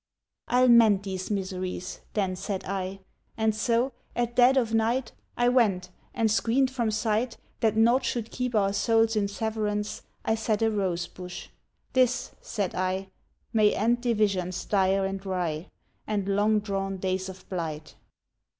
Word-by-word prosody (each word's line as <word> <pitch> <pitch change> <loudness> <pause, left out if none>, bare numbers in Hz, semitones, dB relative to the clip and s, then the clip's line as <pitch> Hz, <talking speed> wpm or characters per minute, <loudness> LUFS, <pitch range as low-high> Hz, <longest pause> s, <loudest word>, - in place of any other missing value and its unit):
"I'll 250 +1 +4
mend 225 -5 +6
these 190 -1 -4
miseries," 185 -2 -4
then 190 -3 0
said 190 +1 -4
I, 195 0 -4 0.4
And 220 -1 +2
so, 235 +4 +1 0.2
at 240 0 -1
dead 255 +2 +6
of 230 -3 +1
night, 225 +2 +1 0.3
I 240 - +3
went 200 -8 +2 0.2
and, 225 -3 +2
screened 250 +4 +2
from 240 -4 0
sight, 220 +2 0 0.2
That 220 -1 +1
nought 235 +4 +4
should 235 -3 -2
keep 250 -2 -2
our 195 -2 +2
souls 225 +2 +2
in 205 -2 +1
severance, 210 0 -2 0.2
I - - +2
set 220 -1 0
a 225 - +3
rose 185 -4 -1
bush. 180 -1 -9 0.4
"This," 255 -1 +2
said 200 -5 -3
I, 185 +1 -2 0.4
"May 215 -2 +4
end 235 +3 +1
divisions 200 -6 0
dire 195 -1 +2
and 195 0 -4
wry, 180 -4 -2 0.4
And 205 -2 -1
long 205 +2 +2
drawn 195 -1 -3
days 185 0 -2
of 185 0 -11
blight." 160 -4 -5
210 Hz, 150 wpm, -27 LUFS, 190-230 Hz, 0.4 s, mend